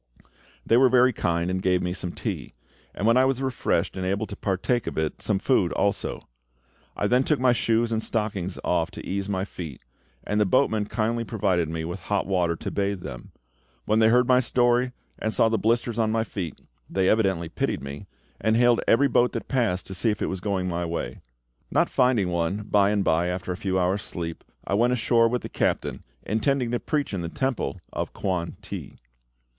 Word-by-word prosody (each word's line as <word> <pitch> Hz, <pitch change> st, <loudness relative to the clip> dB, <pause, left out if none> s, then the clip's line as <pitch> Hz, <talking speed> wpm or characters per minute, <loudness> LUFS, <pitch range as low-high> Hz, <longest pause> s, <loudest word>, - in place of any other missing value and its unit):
They 115 Hz, -, +4 dB
were 130 Hz, 0 st, +6 dB
very 125 Hz, 0 st, +5 dB
kind, 85 Hz, -2 st, 0 dB
and 95 Hz, 0 st, -1 dB
gave 90 Hz, -1 st, +2 dB
me 90 Hz, 0 st, -1 dB
some 90 Hz, -2 st, -4 dB
tea; -, -, -5 dB, 0.4 s
and 100 Hz, -, -2 dB
when 115 Hz, +2 st, +5 dB
I 130 Hz, -, +5 dB
was 135 Hz, -1 st, +1 dB
refreshed 125 Hz, -9 st, 0 dB
and 95 Hz, -, -3 dB
able 100 Hz, +3 st, 0 dB
to 100 Hz, -, -8 dB
partake 100 Hz, +5 st, -1 dB
of -, -, -4 dB
it, 80 Hz, -1 st, -2 dB
some 105 Hz, -, +1 dB
food 95 Hz, -4 st, +2 dB
also. 100 Hz, 0 st, -1 dB, 0.7 s
I -, -, 0 dB
then 125 Hz, +5 st, +3 dB
took 150 Hz, +1 st, +1 dB
my 125 Hz, -1 st, +4 dB
shoes 115 Hz, 0 st, +1 dB
and 110 Hz, -1 st, 0 dB
stockings 100 Hz, -5 st, -2 dB
off 85 Hz, -2 st, +1 dB
to -, -, -8 dB
ease 100 Hz, +1 st, -2 dB
my 95 Hz, -1 st, -1 dB
feet, 80 Hz, -9 st, -8 dB, 0.4 s
and 105 Hz, 0 st, 0 dB
the -, -, +4 dB
boatman 110 Hz, -2 st, +2 dB
kindly 115 Hz, +1 st, -1 dB
provided 95 Hz, -8 st, 0 dB
me 80 Hz, 0 st, -3 dB
with 85 Hz, +3 st, -5 dB
hot 100 Hz, +3 st, -1 dB
water 90 Hz, -3 st, +1 dB
to -, -, -5 dB
bathe 100 Hz, -2 st, -1 dB
them. -, -, -8 dB, 0.5 s
When 110 Hz, +1 st, +2 dB
they 110 Hz, -, +6 dB
heard 125 Hz, +1 st, +4 dB
my 125 Hz, -1 st, +5 dB
story, 125 Hz, 0 st, +2 dB, 0.3 s
and 110 Hz, -, -1 dB
saw 110 Hz, +2 st, +3 dB
the 110 Hz, -1 st, +1 dB
blisters 115 Hz, +2 st, +1 dB
on 110 Hz, -1 st, +2 dB
my 110 Hz, 0 st, +1 dB
feet, 90 Hz, -8 st, -5 dB, 0.3 s
they 95 Hz, -1 st, +1 dB
evidently 95 Hz, -6 st, +2 dB
pitied 80 Hz, -, -2 dB
me, 70 Hz, +8 st, -7 dB, 0.3 s
and 110 Hz, +1 st, +2 dB
hailed 120 Hz, -1 st, +4 dB
every 140 Hz, +5 st, +5 dB
boat 125 Hz, -2 st, +2 dB
that -, -, -4 dB
passed 115 Hz, -9 st, 0 dB
to 95 Hz, -, -6 dB
see 105 Hz, +5 st, +1 dB
if 105 Hz, -, -1 dB
it -, -, -1 dB
was 95 Hz, -, -3 dB
going 95 Hz, -2 st, -1 dB
my 85 Hz, -1 st, -2 dB
way. 85 Hz, -7 st, -4 dB, 0.5 s
Not -, -, +2 dB
finding 125 Hz, -7 st, +3 dB
one, 85 Hz, +4 st, -1 dB
by 100 Hz, -1 st, +3 dB
and 105 Hz, -1 st, +1 dB
by, 85 Hz, 0 st, +2 dB
after 90 Hz, +1 st, -3 dB
a -, -, -2 dB
few 95 Hz, -1 st, -1 dB
hours' 95 Hz, +2 st, +1 dB
sleep, 85 Hz, -3 st, -5 dB, 0.2 s
I -, -, -2 dB
went 120 Hz, +5 st, +3 dB
ashore 115 Hz, -1 st, +3 dB
with 125 Hz, +1 st, -2 dB
the -, -, -4 dB
captain, -, -, -1 dB, 0.2 s
intending 120 Hz, +3 st, 0 dB
to 120 Hz, -, 0 dB
preach 150 Hz, -7 st, -2 dB
in 95 Hz, -, -2 dB
the 85 Hz, -, -4 dB
temple 130 Hz, 0 st, -2 dB, 0.2 s
of -, -, -3 dB
Kwan 90 Hz, -3 st, -2 dB
ti. -, -, -7 dB
105 Hz, 210 wpm, -25 LUFS, 90-120 Hz, 0.7 s, were